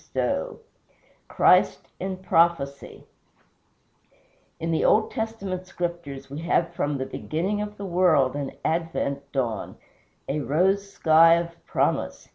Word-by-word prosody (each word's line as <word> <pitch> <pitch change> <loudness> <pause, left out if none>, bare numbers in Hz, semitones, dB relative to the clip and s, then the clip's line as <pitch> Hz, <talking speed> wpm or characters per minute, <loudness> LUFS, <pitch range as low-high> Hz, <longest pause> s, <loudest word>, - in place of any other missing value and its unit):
II - - -1 0.7
CHRIST - - +3
IN 190 -1 -3
PROPHECY 165 -6 0 1.6
In 165 0 -2
the 160 - +1
Old 215 +1 +3
Testament 200 -5 -4
Scriptures 170 -7 -5
we 140 +2 -7
have 170 0 0
from 145 -1 -1
the 130 - -3
beginning 185 +10 -3
of 210 0 -6
the 200 - -6
world 170 -8 +3
an 140 -2 -4
advent 160 -4 -2
dawn 120 -6 -3 0.5
a 145 +3 -1
rose 190 +9 +1
sky 165 0 +6
of 170 0 -2 0.2
Promise. - - -1
170 Hz, 120 wpm, -25 LUFS, 140-185 Hz, 1.6 s, sky